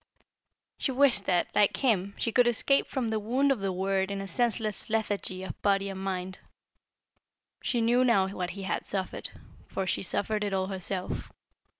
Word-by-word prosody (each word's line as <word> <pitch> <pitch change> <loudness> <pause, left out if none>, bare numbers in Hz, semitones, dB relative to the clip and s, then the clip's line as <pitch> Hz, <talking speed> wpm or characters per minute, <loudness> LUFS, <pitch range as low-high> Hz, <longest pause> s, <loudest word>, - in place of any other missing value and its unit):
She 270 - 0
wished 255 -7 +4
that, 175 -2 +1
like 205 - +3
him, 200 -7 +1
she 230 - -1
could 245 +1 +4
escape 255 +4 +3
from 245 -5 -2
the 220 - 0
wound 255 +6 +2
of 265 - +1
the 195 -1 -1
word 190 +1 0
in 200 0 -3
a 195 - -5
senseless 220 +1 -1
lethargy 205 -4 -1
of - - -7
body 200 -1 +2
and 190 -1 -6
mind. 185 -1 -3 1.2
She 240 - 0
knew 240 +2 +4
now 200 -7 +4
what 180 -2 -3
he 195 +2 -7
had 190 - -2
suffered, 190 -2 -3 0.4
for 195 - -3
she - - 0
suffered 210 +3 -1
it 200 -1 -2
all 190 -1 +1
herself. 190 -1 -4
200 Hz, 180 wpm, -29 LUFS, 190-230 Hz, 1.2 s, wished